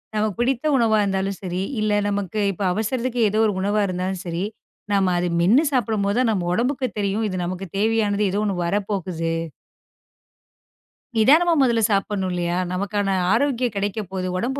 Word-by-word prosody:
நமக்குப் 215 0 -1
பிடித்த 250 +3 0
உணவா 225 -4 +3
இருந்தாலும் 195 -1 -1
சரி. 180 -1 -3 0.2
இல்ல 215 0 0 0.2
நமக்கு 205 0 -2
இப்ப 195 +1 -5
அவசரத்துக்கு 235 +4 -1
ஏதோ 215 +2 0
ஒரு 205 - 0
உணவா 205 +2 +1
இருந்தாலும் 185 0 -3
சரி. 170 +2 -3 0.5
நாம 195 -2 +2
அதை 175 0 0
மென்னு 225 - +5
சாப்பிடும்போதுதான் 225 -1 +1
நம்ம 180 -4 -1
உடம்புக்கு 255 +4 0
தெரியும். 205 +2 0
இது 185 - -4
நமக்குத் 185 +1 -6
தேவையானது 210 -1 +1
ஏதோ 200 - -1
ஒண்ணு 200 -3 -1
வரப்போகுது. 185 -4 -2 1.8
நிதானமா 315 +10 +5
முதல்ல 235 -4 +3
சாப்பிடணும் 195 -2 0
இல்லையா? 175 0 -1 0.2
நமக்கான 200 +2 -1 0.2
ஆரோக்கியம் 245 -1 +1
கிடைக்கப் 200 -1 -2
போகுது. 185 -1 -3
உடம்பு 265 +7 -2
205 Hz, 150 wpm, -22 LUFS, 190-225 Hz, 1.8 s, மென்னு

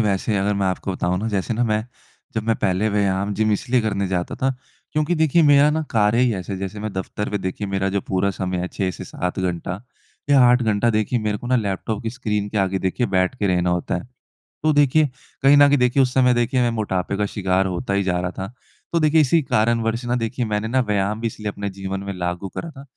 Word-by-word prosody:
वैसे 105 0 0
अगर 100 +1 +1
मैं 100 -1 0
आपको 95 +1 -2
बताऊँ 90 0 -1
ना, 110 - -3
जैसे 100 +1 -1
ना 120 +2 +1
मैं 110 -1 0 0.5
जब 110 - -1
मैं 115 - +3
पहले 95 +3 +1
व्यायाम 100 -1 0
जिम 110 0 +1
इसलिए 120 +4 +1
करने 100 -3 -1
जाता 90 -2 -2
था 135 - +1 0.4
क्योंकि 155 +3 +1
देखिए, 160 0 +3
मेरा 145 0 +6
ना 160 +1 0
कार्य 110 0 +2
ही 125 -1 +3
ऐसे 95 0 -5
है, 95 - -4
जैसे 95 +2 -5
मैं 110 -2 -4
दफ्तर 95 +2 -4
पे, 105 - -1
देखिए, 95 +2 -4
मेरा 95 0 -1
जो 100 +1 -1
पूरा 95 +1 0
समय 90 -1 -3
है, 90 +1 -2
6 95 -2 -2
से 90 - -8
7 90 +1 -4
घंटा 90 +1 -3 0.5
या 140 - +6
8 125 0 +4
घंटा, 110 +1 +2
देखिए, 110 +2 0
मेरे 105 -1 -2
को 120 - -8
ना 125 +1 +3
लैपटॉप 105 0 -2
की 110 - -2
स्क्रीन 105 -4 -2
के 105 - -2
आगे 95 -1 +1
देखिए 95 +6 -1
बैठ 95 +2 +1
के 105 - 0
रहना 90 -1 +1
होता 90 0 -1
है। 90 - -2 0.6
तो 155 - +3
देखिए, 145 +1 +4 0.3
कहीं 140 +1 +6
न 145 - +8
कहीं 145 - +3
देखिए, 125 +2 +3
उस 125 -1 +1
समय 125 -1 +4
देखिए 120 +2 +1
मैं 120 - +2
मोटापे 100 -4 -2
का 105 0 0
शिकार 95 -2 0
होता 95 +3 -2
ही 100 - +2
जा 90 -1 0
रहा 90 0 -2
था, 95 +3 -5 0.4
तो 170 - +2
देखिए, 155 +1 +4
इसी 155 +2 +3
कारणवश 115 0 +1
ना, 120 0 0
देखिए, 120 +1 -2
मैंने 105 +1 -1
ना 130 +2 +2
व्यायाम 105 -1 0
भी 115 - -2
इसलिए 105 -1 -4
अपने 100 0 -4
जीवन 95 0 -5
में 100 - -4
लागू 90 +1 -3
करा 165 - -6
था, 135 -3 -12
105 Hz, 245 wpm, -22 LUFS, 95-120 Hz, 0.6 s, न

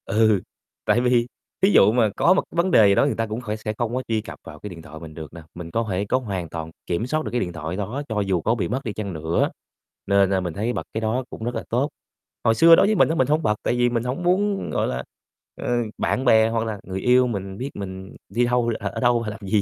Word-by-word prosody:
Ừ, 110 -2 +3 0.4
tại 120 - +3
vì 125 -1 +2 0.3
thí 190 - +5
dụ 105 - +6
mà 115 -2 +3
có 180 - +4
một 190 - +1
vấn 175 +2 +2
đề 110 -8 +7
gì 100 - +4
đó - - +4
người 145 - 0
ta 115 - -1
cũng 110 +3 -4
khoẻ 105 -3 -3
sẽ 110 0 -4
không 120 0 -2
có 130 - 0
truy 110 -1 0
cập - - -10
vào - - -11
cái 105 - -7
điện 85 -3 -10
thoại 80 0 -11
mình 80 -1 -10
được 80 -1 -9
nè, 85 - -9
mình 85 -1 -8
có 115 +4 0
thể 95 +1 -1
có 125 - +1
hoàn 95 -9 -4
toàn 80 -1 -6 0.2
kiểm 90 +6 -1
soát 155 +3 0
được - - -4
cái 125 - 0
điện 90 -6 -3
thoại 80 +1 -5
đó 105 +8 -3
cho 110 -1 -1
dù 95 -3 0
có 115 +8 +1
bị 115 - -1
mất 130 +4 -3
đi 110 - -4
chăng 100 -3 -5
nữa, 80 +1 0 0.6
nên, 100 -1 +4
a, 95 - +2
mình 90 -3 -3
thấy 110 +7 -2
bật - - -3
cái 110 - -2
đó 115 +4 0
cũng - - -8
rất 120 +1 -3
là - - -3
tốt. 130 +5 +1 0.5
Hồi 115 - +3
xưa 165 +8 +8
đối - - +5
với 215 +1 +2
mình - - +4
á 160 - 0
mình 130 -5 +2
hông 155 +3 +1
bật, 105 - +2
tại - - +1
vì 120 0 +3
mình 120 -1 -1
hổng 130 +8 -3
muốn, 195 +3 +1
gọi - - 0
là, 65 +1 -3 0.6
ờ, - - -4 0.3
bạn 130 - -1
bè 110 -2 +5
hoặc 115 0 -1
là 110 -2 -4
người 95 0 -5
yêu 125 +1 +4
mình 95 -4 -4
biết 130 +5 -4
mình 95 -1 -7
đi 120 +5 +1
đâu, 120 -1 +1
ở 100 - -3
ở 115 - -6
đâu, 120 -1 +2
làm 105 +1 -5
gì, 100 +2 +2
110 Hz, 285 wpm, -23 LUFS, 95-125 Hz, 0.6 s, xưa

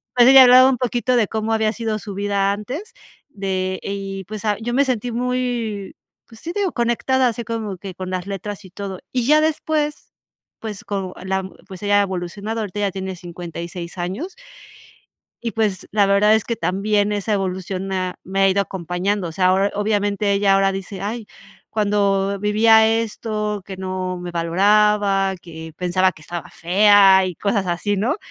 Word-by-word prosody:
Pero, 245 0 +7
ella 265 -1 +10
hablaba 255 +1 +8
un 260 - +1
poquito 250 0 0
de 220 -4 +2
cómo 220 0 -2
había 220 -1 +1
sido 220 -2 -3
su 205 -1 -8
vida 200 -1 +1
antes 270 - -6 0.4
de 190 -4 -3
y, 195 -1 -5
pues, 215 +2 -7
o 210 - +2
sea, 205 - +1
yo 240 +1 -3
me 280 +3 +3
sentí 245 -2 -2
muy, 240 -4 -2 0.3
pues 225 -1 -15
sí, 340 - -5
digo, 400 -3 0
conectada, 245 +2 +1
así 235 0 -5
como 220 -5 -4
que 190 -1 -8
con 185 0 -6
las 185 +1 -3
letras 205 +1 -6
y - - -12
todo. 190 0 -6
Y 250 -2 -1
ya 305 +1 +5
después, 305 -1 -1 0.5
pues, 215 -3 -7
con 195 -3 -3
la 190 0 -1 0.2
pues 190 +1 -10
ella 205 0 +3
ha - - +4
evolucionado, 200 +4 -4
ahorita 205 -1 -5
ya 200 -1 0
tiene 190 0 -5
56 170 0 -7
años 195 - -4 1.1
y, 230 -1 -3
pues, 210 -4 -1
la 205 -1 +4
verdad 205 +2 +4
es 220 - +1
que 230 - -3
también 205 +2 0
esa 205 +1 -2
evolución 190 -1 -2
me 190 - -2
ha 185 -1 -2
me 195 +1 -2
ha 195 - +5
ido 200 +1 +2
acompañando. 185 +1 -2
O - - -7
sea, 185 +2 +1
ahora, 195 +2 +3
obviamente 205 -1 0
ella 200 0 +3
ahora 195 0 +3
dice: 195 0 -6
"Ay, 220 +2 -4 0.4
cuando 200 -2 +1
vivía 220 +1 +5
esto, 215 -2 -2
que 190 0 -8
no 185 -1 -3
me 175 0 -6
valoraba, 195 +3 +2
que 160 -1 -10
pensaba 185 +1 +1
que 155 - -17
estaba 175 +1 -6
fea 195 +1 +5
y 180 - -4
cosas 200 0 -1
así", 180 +4 -1
¿no? 215 +6 0
200 Hz, 185 wpm, -21 LUFS, 190-220 Hz, 1.1 s, ella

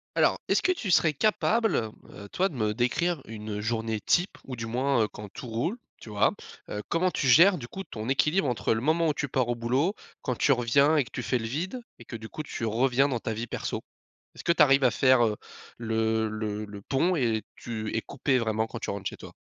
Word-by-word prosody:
Alors, - - +3
est-ce - - +2
que 370 - +2
tu 240 - -2
serais 160 -3 +4
capable, 220 - +2
heu, 110 -2 -6
toi 190 - +2
de 195 - -10
me 110 -5 0
décrire 145 +7 0
une 105 -1 -6
journée 110 0 -1
type 175 - +1
ou 130 - -6
du 115 -1 -5
moins, 125 +2 +1
heu, - - -4
quand 105 0 -9
tout 130 +6 -9
roule, 120 - -2 0.2
tu - - -11
vois? 105 -1 +2 0.4
Heu, 105 0 -4
comment 180 +2 +2
tu 140 - -1
gères 175 +9 +7
du 120 -6 -7
coup 190 +9 -7
ton 110 - -7
équilibre, 150 +5 +2
entre 120 -2 0
le 110 - -2
moment 160 +5 +2
où 155 - +2
tu 145 - -2
pars 130 -1 0
au 120 - 0
boulot, 130 - 0 0.3
quand 125 -3 -2
tu - - +3
reviens 140 +5 +4
et 145 - +4
que 125 - -14
tu - - -4
fais 125 - 0
le 115 - -4
vide 180 - -3 0.2
et - - -14
que, - - -8
du 110 0 -8
coup, 155 - -6
tu 135 - -6
reviens 125 +4 +2
dans 130 -4 -1
ta 110 - -3
vie 115 +2 -4
perso? - - -4 0.5
Est-ce - - -10
que - - +3
tu 170 - +3
arrives 135 -1 +6
à 125 - +5
faire, 130 -3 +4
heu, 105 - 0 0.4
le 110 -1 0
le 105 -1 -3
le 100 -1 -10
pont 170 - +1
et 115 - 0
tu 110 -2 -5
es - - 0
coupée, 135 +1 0
vraiment, 110 -2 0
quand 115 - -7
tu - - -5
rentres 100 -1 -3
chez - - -11
toi? - - -11
120 Hz, 245 wpm, -27 LUFS, 110-150 Hz, 0.5 s, gères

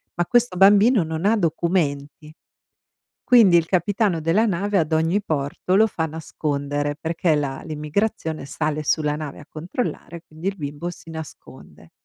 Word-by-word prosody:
Ma 175 - 0
questo 240 -3 +1
bambino 205 +2 +5
non 160 +2 -4
ha 220 +2 +3
documenti, 155 -4 -1 0.9
quindi 220 -8 +6
il 165 - +2
capitano 185 0 0
della 175 +9 +2
nave, 200 +1 0
ad 160 -1 -1
ogni 165 +6 +1
porto, 155 +3 -1
lo 220 - +5
fa 160 -6 -2
nascondere 145 -2 -3
perché 165 0 0
la 140 -2 -3
l'immigrazione 160 0 -3
sale 155 +2 -2
sulla 150 0 0
nave 150 -2 -6
a - - -14
controllare, 170 0 -5
quindi 160 +5 -5
il 200 - -3
bimbo 150 +3 -5
si 165 -1 -12
nasconde. 160 -1 -11
165 Hz, 150 wpm, -22 LUFS, 150-195 Hz, 0.9 s, quindi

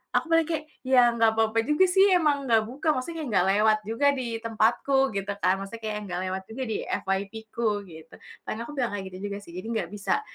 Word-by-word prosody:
aku 330 - +1
paling 330 -1 +4
kayak, 310 -2 -3 0.2
"Ya, 250 -2 +5
enggak 225 -1 +3
apa-apa 225 0 +2
juga, 300 +6 +4
sih, 385 +2 +5
emang 295 -5 +2
enggak 225 -2 +4
buka, 285 +5 -6
maksudnya 315 +5 -4
enggak 190 -5 +2
lewat 215 +2 +4
juga 280 +6 +2
di 240 -4 -3
tempatku," 245 +5 +2
gitu, 195 0 -2
kan. 185 +2 +3
Maksudnya, 225 +4 -8
kayak 215 -1 -2
enggak 180 -1 -4
lewat 190 0 -4
juga 260 +4 -5
di 220 - -1
FYP-ku, 220 +4 -3 0.2
gitu. 160 0 -13 0.3
Dan, 215 - -4
aku 235 - -7
bilang 245 -5 0
kayak 195 -1 -5
gitu, 185 - -10
juga, 200 - -4
sih, 170 - -13
jadi 185 - -6
enggak 195 -7 -2
bisa 210 - -1
225 Hz, 215 wpm, -26 LUFS, 200-270 Hz, 0.3 s, Ya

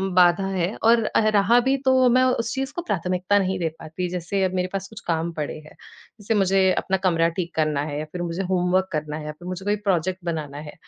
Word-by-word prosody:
बाधा 180 +1 +5
है 190 0 -1
और 230 0 +5
अ, - - +1 0.2
रहा 205 +4 +5
भी 265 +2 +2
तो 260 -1 +5
मैं 255 +2 +4
उस 235 -3 0
चीज़ 270 0 -3
को 345 - -2
प्राथमिकता 185 - 0
नहीं 190 -1 0
दे 165 -2 0
पाती, 180 +3 -4
जैसे 180 +2 -2
अब 185 - 0
मेरे 180 0 0
पास 195 0 -3
कुछ 220 - -10
काम 165 0 0
पड़े 150 -2 -4
हैं, 155 0 -13 0.5
जैसे 205 +2 -1
मुझे 195 -1 +3 0.2
अपना 190 - 0
कमरा 165 -2 +3
ठीक 175 -1 -3
करना 155 -2 +1
है, 150 0 -4
फिर 180 - -5
मुझे 175 +2 -3
होमवर्क 185 +1 +1
करना 150 -1 -3
है 155 - -7
या 150 - -4
फिर 175 +4 -12
मुझे 185 +1 -5
कोई 205 0 +2
प्रोजेक्ट 185 0 +1
बनाना 155 -4 -4
है। - - -9
185 Hz, 230 wpm, -23 LUFS, 165-200 Hz, 0.5 s, बाधा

